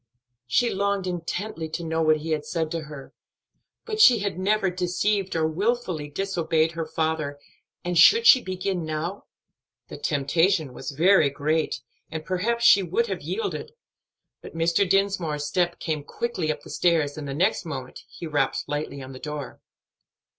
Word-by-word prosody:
She 240 - +2
longed 200 0 0
intently 175 -1 -4
to 170 +2 -4
know 160 0 -1
what 155 -1 +4
he 160 +2 -5
had 150 -1 0
said 160 -1 -2
to 165 -2 -3
her; 145 -3 -10 0.7
but 435 -1 -1
she 250 - +8
had 200 -4 -3
never 195 0 +1
deceived 185 +2 -1
or 160 -1 +2
wilfully 180 -3 -1
disobeyed 165 -2 0
her 165 -1 -4
father, 155 -3 -2 0.5
and 175 0 -1
should 455 - +7
she 260 - +8
begin 185 -2 -3
now? 160 +5 -4 0.6
The - - -7
temptation 155 0 +1
was - - -6
very 160 +2 +4
great, 155 +3 -1 0.3
and 160 -1 -6
perhaps 235 +6 0
she 200 - +8
would 450 - 0
have - - -4
yielded; 450 +1 -4 0.7
but - - -11
Mr. 170 +3 +2
Dinsmore's 190 -7 +1
step 175 +3 0
came 155 -3 -2
quickly 180 -1 -2
up 150 -1 -5
the - - -11
stairs, 160 -5 +1
and 150 -2 -6
the 135 - -4
next 180 +6 +1
moment 135 -6 -6
he - - -9
rapped 150 -2 0
lightly 145 -2 -4
on 130 - -9
the 130 - -9
door. 150 -2 -6
165 Hz, 165 wpm, -25 LUFS, 155-195 Hz, 0.7 s, she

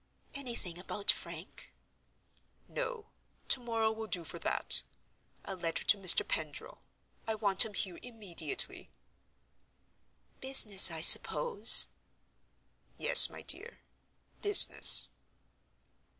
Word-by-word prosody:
"Anything 235 - -10
about 200 +2 -5
Frank?" - - -13 1.0
"No: 480 -3 -12 0.4
to 270 - 0
morrow 225 -2 -7
will 220 0 -13
do 180 -5 -6
for - - -13
that. - - -2 0.6
A 195 - -12
letter 170 -2 -9
to - - -1
Mr. 195 -3 +1
Pendril. 155 -2 -11 0.5
I 220 - -7
want 200 -3 +1
him 210 -2 -15
here 180 -3 -10
immediately." 200 - -9 1.5
"Business, 220 -8 +2
I 165 -1 -11
suppose?" 470 - +6 1.1
"Yes, - - +4
my - - -18
dear—business." 410 -1 -1
210 Hz, 95 wpm, -25 LUFS, 180-245 Hz, 1.5 s, suppose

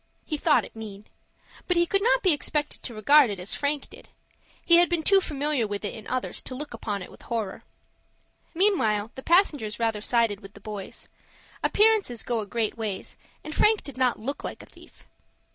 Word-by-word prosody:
He 310 - -2
thought 295 0 +3
it - - -15
mean. 210 -2 -9 0.6
But 360 - +1
he 345 - +4
could 395 +3 +1
not - - +3
be 370 - +6
expected 295 0 -1
to 235 - -6
regard 280 +5 +5
it 200 -2 -4
as 180 +3 0
Frank 285 0 -1
did. - - -14 0.6
He 340 - +7
had 350 0 +5
been 345 -2 0
too 390 +3 +5
familiar 290 - -1
with 205 0 -4
it 205 - -3
in 220 -3 -10
others 255 0 -2
to 255 - -8
look 290 -1 -5
upon 205 -4 -4
it - - -11
with - - -16
horror. 220 -5 -4 0.9
Meanwhile 230 - +2
the 265 - -8
passengers 295 - +2
rather 225 -2 -1
sided 230 -3 +1
with 195 -1 -14
the - - -12
boys. 205 -1 -8 0.6
Appearances 420 - +2
go 235 -2 -1
a 210 - -5
great 225 +1 -1
ways, 210 -4 -4 0.3
and 310 - -6
Frank 430 +4 +3
did 280 - -8
not 255 -2 +1
look 275 +6 -4
like - - -6
a - - -13
thief. - - -18
250 Hz, 200 wpm, -26 LUFS, 215-315 Hz, 0.9 s, He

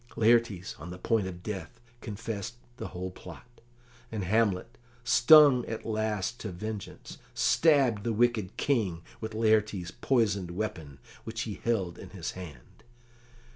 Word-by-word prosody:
Laertes, 115 -5 +2
on 80 +4 -8
the 90 - -7
point 105 +1 0
of 90 -1 -8
death, 105 -3 -6 0.2
confessed 110 0 -5 0.2
the - - -5
whole 90 +1 -5
plot, 120 +6 -13 0.5
and 110 -3 -3
Hamlet, 105 +2 +1 0.3
stung 125 +2 +7
at 110 0 -5
last 110 0 -2
to 105 - -5
vengeance, 105 +3 -7 0.2
stabbed 135 -10 +3
the 115 - 0
wicked 110 -4 +1
King 100 -12 0 0.2
with 110 0 -6
Laertes's 110 -5 +1
poisoned 105 -6 +1
weapon, 85 -7 -5 0.3
which 110 0 -5
he 110 -4 -5
held 95 -7 -1
in 95 - -10
his 90 -3 -5
hand. 75 -10 -11
110 Hz, 135 wpm, -29 LUFS, 95-115 Hz, 0.5 s, stung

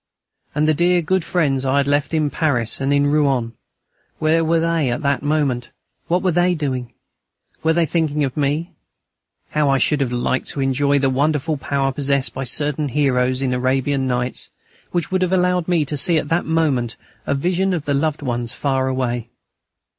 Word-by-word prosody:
And 150 +1 +2
the 155 - +4
dear, 175 +2 +2
good 185 +2 +1
friends 145 -8 0
I 135 +1 +1
had 140 - +3
left 145 +1 0
in 155 -3 0
Paris 130 -7 +1
and 135 +1 0
in 145 0 +3
Rouen 140 -6 +1 0.6
where 160 +1 +2
were 165 +1 +2
they 165 -4 +1
at 120 +6 -2
that 140 -1 +1
moment? 145 -4 0 0.4
What 180 +2 +1
were 185 - +2
they 175 +1 +2
doing? 130 -6 -3 0.7
Were 160 0 +2
they 170 0 +2
thinking 155 -2 0
of 130 -2 -2
me? 150 +3 -1 0.8
How 150 -2 +2
I 135 - +3
should 145 +3 +1
have 130 -3 0
liked 125 +1 -1
to - - -5
enjoy 140 +1 +2
the 135 -1 +1
wonderful 150 +3 0
power 135 -1 -1
possessed 140 0 0
by 135 +1 -4
certain 150 +3 -1
heroes 130 -2 +1
in 130 - 0
the 125 - 0
Arabian 130 +1 0
Nights, 125 0 -2 0.4
which 175 0 -2
would 185 0 +1
have 185 0 +1
allowed 180 -2 +1
me 170 -4 +2
to 150 +1 -4
see 165 +4 +3
at 150 -1 -2
that 165 +2 +1
moment 145 -8 0 0.3
a 140 - +1
vision 180 +6 0
of 170 -5 -2
the 145 - 0
loved 150 +1 -1
ones 120 -2 -2
far 135 -2 0
away. 120 -3 -2
145 Hz, 190 wpm, -20 LUFS, 130-160 Hz, 0.8 s, the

